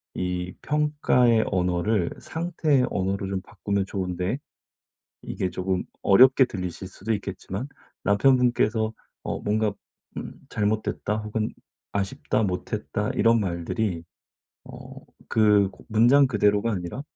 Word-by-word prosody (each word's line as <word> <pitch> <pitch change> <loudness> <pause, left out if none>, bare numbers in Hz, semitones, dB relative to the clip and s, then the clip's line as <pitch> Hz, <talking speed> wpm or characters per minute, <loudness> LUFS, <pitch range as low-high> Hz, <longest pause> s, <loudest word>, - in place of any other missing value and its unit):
이 90 0 -3
평가의 145 -6 +2
언어를 90 +1 +1
상태의 160 -5 0
언어로 95 +1 -1
좀 95 -1 -2
바꾸면 100 +1 -2
좋은데 95 +4 -2 0.8
이게 95 - -2
쪼금 90 0 -2 0.2
어렵게 130 +6 +7
들리실 90 -5 -5
수도 100 +4 -3
있겠지만 100 +3 -5 0.4
남편분께서 110 0 +3 0.3
어 - - -3
뭔가 105 0 0 0.4
음 - - -6 0.2
"잘못됐다." 105 0 -1
혹은 110 0 -2 0.4
"아쉽다. 100 +2 -1
못했다." 90 -3 -2
이런 115 +1 +4
말들이 90 0 -2 0.6
어 - - -11 0.5
그 105 -3 +4 0.2
문장 120 +6 +5
그대로가 105 -1 +2
아니라 90 +6 -4
105 Hz, 255 characters per minute, -25 LUFS, 95-115 Hz, 0.8 s, 어렵게